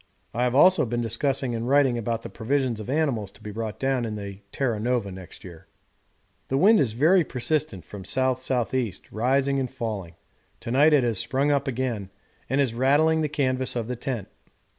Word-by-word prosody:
I 120 Hz, +2 st, +1 dB
have 125 Hz, 0 st, 0 dB
also 155 Hz, -1 st, +6 dB
been 120 Hz, +1 st, -1 dB
discussing 125 Hz, +2 st, 0 dB
and 115 Hz, +2 st, -3 dB
writing 140 Hz, -3 st, +4 dB
about 115 Hz, 0 st, -2 dB
the -, -, -7 dB
provisions 125 Hz, 0 st, -1 dB
of 110 Hz, -, -7 dB
animals 135 Hz, -9 st, 0 dB
to -, -, -17 dB
be 105 Hz, -, -6 dB
brought 110 Hz, 0 st, -5 dB
down 135 Hz, -2 st, 0 dB
in 110 Hz, -2 st, -3 dB
the 100 Hz, -2 st, -7 dB
Terra 120 Hz, -6 st, -1 dB
Nova 120 Hz, -3 st, -1 dB
next 95 Hz, -1 st, -11 dB
year. 90 Hz, 0 st, -12 dB, 0.8 s
The 135 Hz, -, 0 dB
wind 210 Hz, +8 st, +6 dB
is 115 Hz, -6 st, +1 dB
very 165 Hz, +9 st, +4 dB
persistent 135 Hz, -, -2 dB
from 100 Hz, +5 st, -9 dB
the 95 Hz, -, -8 dB
S.S.E., 130 Hz, -3 st, 0 dB, 0.2 s
rising 135 Hz, +4 st, +1 dB
and 130 Hz, -2 st, -2 dB
falling; 110 Hz, -9 st, -5 dB, 0.5 s
to 115 Hz, -, -5 dB
night 145 Hz, +5 st, +5 dB
it 145 Hz, -4 st, +5 dB
has 115 Hz, -5 st, +1 dB
sprung 140 Hz, +3 st, +1 dB
up 140 Hz, 0 st, +1 dB
again, 120 Hz, -6 st, -2 dB, 0.4 s
and 135 Hz, +3 st, +1 dB
is 135 Hz, -5 st, +1 dB
rattling 145 Hz, +6 st, +3 dB
the 155 Hz, -, 0 dB
canvas 130 Hz, -4 st, -1 dB
of 115 Hz, -2 st, -2 dB
the 125 Hz, -, -3 dB
tent. 120 Hz, -4 st, -4 dB
125 Hz, 195 wpm, -25 LUFS, 110-140 Hz, 0.8 s, also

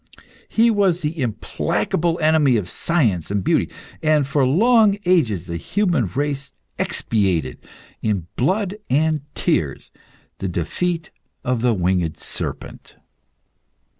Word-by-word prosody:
He 230 Hz, +1 st, +4 dB
was 195 Hz, -5 st, +2 dB
the 155 Hz, 0 st, -3 dB
implacable 160 Hz, +8 st, -1 dB
enemy 155 Hz, -5 st, +4 dB
of 90 Hz, -4 st, -4 dB
science 115 Hz, -, 0 dB
and 100 Hz, -1 st, -1 dB
beauty, -, -, +2 dB, 0.3 s
and 155 Hz, -2 st, +3 dB
for 135 Hz, -1 st, +2 dB
long 215 Hz, -, +4 dB
ages 120 Hz, -, +2 dB
the 85 Hz, -2 st, -4 dB
human 175 Hz, -, 0 dB
race 140 Hz, +4 st, -3 dB, 0.3 s
expiated, 95 Hz, -, 0 dB, 0.4 s
in 100 Hz, -6 st, -1 dB
blood 195 Hz, -, 0 dB
and 155 Hz, +2 st, +2 dB
tears, -, -, -1 dB, 0.5 s
the 95 Hz, -, -2 dB
defeat 165 Hz, -, -2 dB, 0.3 s
of 125 Hz, -2 st, 0 dB
the 120 Hz, -2 st, +2 dB
winged 90 Hz, -3 st, 0 dB
serpent. -, -, -6 dB
140 Hz, 115 wpm, -21 LUFS, -, 0.5 s, He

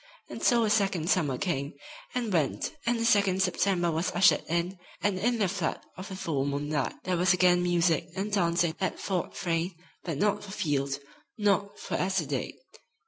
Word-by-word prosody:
And -, -, -7 dB
so 235 Hz, -1 st, +4 dB
a 215 Hz, -, +1 dB
second 195 Hz, -5 st, +1 dB
summer 145 Hz, -8 st, +1 dB
came 145 Hz, -8 st, -2 dB, 0.4 s
and 235 Hz, -5 st, -1 dB
went 160 Hz, -, 0 dB
and 240 Hz, 0 st, +2 dB
a 230 Hz, -, 0 dB
second 200 Hz, -4 st, +3 dB
September 175 Hz, -4 st, +1 dB
was 165 Hz, +3 st, 0 dB
ushered 175 Hz, +1 st, +5 dB
in, 175 Hz, +3 st, -1 dB, 0.2 s
and 185 Hz, 0 st, 0 dB
in 240 Hz, +4 st, +1 dB
the 205 Hz, -3 st, +2 dB
flood 185 Hz, -2 st, -2 dB, 0.2 s
of 185 Hz, +3 st, -8 dB
the 190 Hz, -, -6 dB
full 155 Hz, -7 st, -1 dB
moonlight 145 Hz, 0 st, -1 dB
there 185 Hz, -1 st, 0 dB
was 180 Hz, +2 st, +4 dB
again 180 Hz, -1 st, +4 dB
music 175 Hz, -2 st, +2 dB
and 200 Hz, +2 st, -3 dB
dancing 170 Hz, -4 st, +2 dB
at 190 Hz, -, -1 dB
Fort 185 Hz, -4 st, -2 dB
Frayne, 170 Hz, 0 st, -1 dB, 0.3 s
but 165 Hz, -5 st, -3 dB
not 205 Hz, +5 st, +1 dB
for 205 Hz, -, -10 dB
Field, 140 Hz, -7 st, -1 dB, 0.4 s
not 205 Hz, -1 st, +1 dB
for -, -, -7 dB
Esther 185 Hz, -3 st, 0 dB
Dade. 135 Hz, -2 st, -3 dB
180 Hz, 185 wpm, -28 LUFS, 165-200 Hz, 0.4 s, ushered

